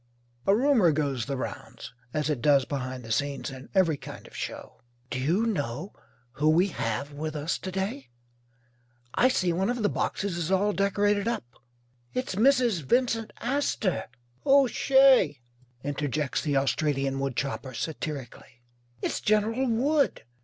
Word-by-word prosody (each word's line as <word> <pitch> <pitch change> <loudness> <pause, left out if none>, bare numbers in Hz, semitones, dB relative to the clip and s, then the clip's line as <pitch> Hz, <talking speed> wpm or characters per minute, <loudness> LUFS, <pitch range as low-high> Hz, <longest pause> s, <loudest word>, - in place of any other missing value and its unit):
A 195 - +6
rumour 240 - +4
goes 140 -6 -1
the 140 -2 -2
rounds 130 - -7 0.2
as 150 +2 -1
it 150 -6 -1
does 140 -3 +4
behind 130 -1 -4
the 115 - -7
scenes 140 +3 -1
in 130 0 -10
every 170 -6 +3
kind - - -10
of - - -14
show. - - -6 0.3
"Do 125 - -2
you 170 - +1
know 155 - -2 0.4
who 145 +4 +1
we 175 +5 +4
have 115 - -3
with 155 +2 -5
us 150 +2 -2
to 185 - -5
day? 190 - -3 1.0
I 250 - +4
see 185 -9 +1
one 190 +5 0
of 245 -2 -1
the 205 - +3
boxes 200 -4 -2
is 170 -1 -2
all 200 +2 +2
decorated 205 +1 +1
up." 235 - -1 0.7
"It's 255 -5 -2
Mrs. 240 - +3
Vincent 225 - +1
Astor." 245 -7 0 0.4
"Who's 275 -2 +5
she?" 265 - +5 0.4
interjects 145 0 -1
the 145 -3 0
Australian 135 -1 0
woodchopper, 135 -1 -3
satirically. 135 -4 -6 0.4
"It's - - -1
General 220 +5 +2
Wood." 275 +6 +1
165 Hz, 145 wpm, -27 LUFS, 140-220 Hz, 1.0 s, A